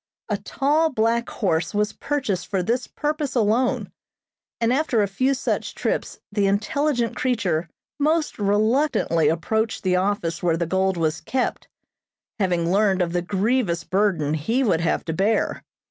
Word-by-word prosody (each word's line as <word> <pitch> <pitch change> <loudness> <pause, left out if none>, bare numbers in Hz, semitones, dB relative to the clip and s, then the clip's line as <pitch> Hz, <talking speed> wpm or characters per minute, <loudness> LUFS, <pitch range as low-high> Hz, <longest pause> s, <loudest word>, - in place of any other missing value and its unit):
A - - 0
tall, 300 +4 +1
black 235 -2 0
horse 165 -4 -1
was 210 0 +1
purchased 265 -11 -2
for 190 -3 -1
this 240 +6 -1
purpose 300 -2 -2
alone, 235 +2 +1 0.7
and 230 +1 +2
after 260 -6 +2
a - - 0
few 255 +8 +1
such - - -2
trips - - -2
the 205 -1 +1
intelligent 235 +4 0
creature 190 -11 0 0.3
most 310 -1 +1
reluctantly 210 - +2
approached 220 +8 0
the 180 -1 +2
office 180 -3 -1
where 170 -2 +1
the 170 - 0
gold 190 +2 +1
was 160 -1 0
kept, 260 -1 -2 0.7
having 175 -3 +1
learned 195 -2 +3
of 170 -1 -3
the 175 - +1
grievous 195 -1 0
burden 185 -6 +1
he 225 - 0
would 180 -9 +2
have 165 - 0
to 160 - -2
bear. 205 +6 +1
205 Hz, 150 wpm, -23 LUFS, 175-250 Hz, 0.7 s, learned